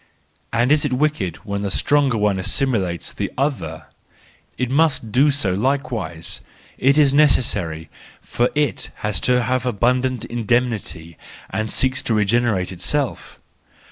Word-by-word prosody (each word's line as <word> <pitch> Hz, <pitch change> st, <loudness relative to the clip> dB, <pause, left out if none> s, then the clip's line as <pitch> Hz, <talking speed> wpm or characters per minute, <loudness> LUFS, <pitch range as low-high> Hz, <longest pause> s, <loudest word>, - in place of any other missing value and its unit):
And 120 Hz, +3 st, +1 dB
is 150 Hz, -1 st, +4 dB
it 145 Hz, -3 st, -1 dB
wicked 125 Hz, -, 0 dB
when 100 Hz, -1 st, -3 dB
the 100 Hz, -, -2 dB
stronger 140 Hz, +4 st, +2 dB
one 105 Hz, -2 st, +1 dB
assimilates 95 Hz, -, -1 dB
the -, -, -3 dB
other? 80 Hz, -, -2 dB, 0.7 s
It 125 Hz, -1 st, -2 dB
must 140 Hz, -6 st, +2 dB
do 135 Hz, +6 st, +4 dB
so 135 Hz, -10 st, +1 dB
likewise: 110 Hz, -, -2 dB, 0.4 s
it 140 Hz, +3 st, +3 dB
is 145 Hz, -3 st, +5 dB
necessary, 100 Hz, -, +2 dB, 0.3 s
for 120 Hz, +1 st, -1 dB
it 150 Hz, -1 st, 0 dB, 0.2 s
has 105 Hz, -, 0 dB
to 125 Hz, -1 st, +2 dB
have 130 Hz, +1 st, 0 dB
abundant 125 Hz, +2 st, 0 dB
indemnity 115 Hz, -8 st, -2 dB, 0.3 s
and 110 Hz, +3 st, -2 dB
seeks 130 Hz, +3 st, +1 dB
to 115 Hz, -, 0 dB
regenerate 105 Hz, -3 st, +1 dB
itself. 135 Hz, +10 st, -3 dB
120 Hz, 135 wpm, -21 LUFS, 100-135 Hz, 0.7 s, is